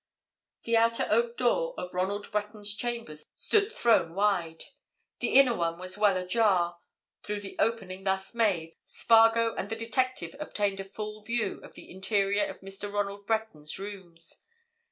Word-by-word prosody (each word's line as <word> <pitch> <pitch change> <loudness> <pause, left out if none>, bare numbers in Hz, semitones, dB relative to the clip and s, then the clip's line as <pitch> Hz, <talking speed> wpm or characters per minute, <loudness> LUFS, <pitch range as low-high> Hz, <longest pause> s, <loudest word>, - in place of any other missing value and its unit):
The 230 - +1
outer 230 0 +3
oak 235 +2 +2
door - - +1
of 180 - -6
Ronald 195 +4 -2
Breton's 210 -1 -1
chambers 210 -9 -3
stood 425 0 +2
thrown 225 - +3
wide; 190 -5 0 0.6
the - - -1
inner 260 -3 +7
one 170 -2 -1
was 185 +1 -4
well 205 -2 +3
ajar; 180 -3 +2 0.4
through 210 0 -4
the 195 - -8
opening 195 -5 -1
thus 190 +1 -1
made 185 -8 +1
Spargo 225 0 +4
and 200 - -4
the 225 - -2
detective 255 +4 -1
obtained 205 -9 -1
a - - -3
full 210 +2 -7
view 220 -2 -2
of - - -13
the - - -12
interior 200 +1 +1
of - - -8
Mr. 195 +1 -6
Ronald 200 0 -3
Breton's 220 -10 -2
rooms. 190 -4 -7
205 Hz, 155 wpm, -29 LUFS, 190-230 Hz, 0.6 s, inner